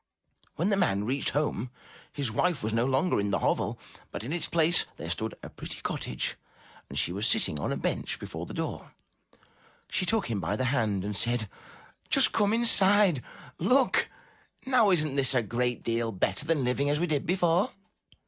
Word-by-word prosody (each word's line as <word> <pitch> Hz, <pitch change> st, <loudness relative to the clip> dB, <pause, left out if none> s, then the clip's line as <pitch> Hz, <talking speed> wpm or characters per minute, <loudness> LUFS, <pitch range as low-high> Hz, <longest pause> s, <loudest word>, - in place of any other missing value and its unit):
When 175 Hz, +6 st, 0 dB
the 200 Hz, -, +2 dB
man 105 Hz, -, +1 dB
reached 130 Hz, +6 st, -1 dB
home, 145 Hz, -4 st, -1 dB, 0.4 s
his 140 Hz, -6 st, -3 dB
wife 170 Hz, +3 st, 0 dB
was 110 Hz, 0 st, -1 dB
no 115 Hz, +1 st, +2 dB
longer 135 Hz, -, +1 dB
in 100 Hz, 0 st, -1 dB
the 100 Hz, -, +1 dB
hovel, -, -, 0 dB, 0.3 s
but -, -, -6 dB
in 135 Hz, +7 st, -4 dB
its 175 Hz, -, 0 dB
place 170 Hz, +1 st, +3 dB
there 85 Hz, -, -5 dB
stood 110 Hz, +6 st, -3 dB
a -, -, -7 dB
pretty -, -, -8 dB
cottage, 60 Hz, -, -3 dB, 0.5 s
and -, -, -7 dB
she -, -, +1 dB
was 100 Hz, +5 st, -1 dB
sitting 75 Hz, -, +2 dB
on -, -, -2 dB
a -, -, -1 dB
bench -, -, -2 dB
before -, -, -7 dB
the -, -, -8 dB
door. -, -, -5 dB, 1.0 s
She 185 Hz, -, 0 dB
took 225 Hz, +2 st, +1 dB
him 110 Hz, -4 st, -2 dB
by 100 Hz, -, -2 dB
the 130 Hz, -, -2 dB
hand 105 Hz, -7 st, 0 dB
and 105 Hz, 0 st, -3 dB
said, 120 Hz, +1 st, +2 dB, 0.6 s
*7ust -, -, +4 dB
come 205 Hz, 0 st, +2 dB
inside. 205 Hz, -, +5 dB, 0.4 s
Look! 250 Hz, +9 st, +2 dB, 0.6 s
Now 250 Hz, -5 st, +4 dB
isn*t 155 Hz, -6 st, +2 dB
this 135 Hz, -1 st, +5 dB
a 120 Hz, -, +2 dB
great 120 Hz, +3 st, -2 dB
deal 115 Hz, 0 st, -1 dB
better 95 Hz, -, -1 dB
than 155 Hz, -4 st, +1 dB
living 125 Hz, +3 st, 0 dB
as 145 Hz, +1 st, +1 dB
we 175 Hz, -, +1 dB
did 150 Hz, -5 st, -1 dB
before? 175 Hz, 0 st, +2 dB
135 Hz, 185 wpm, -28 LUFS, 110-175 Hz, 1.0 s, inside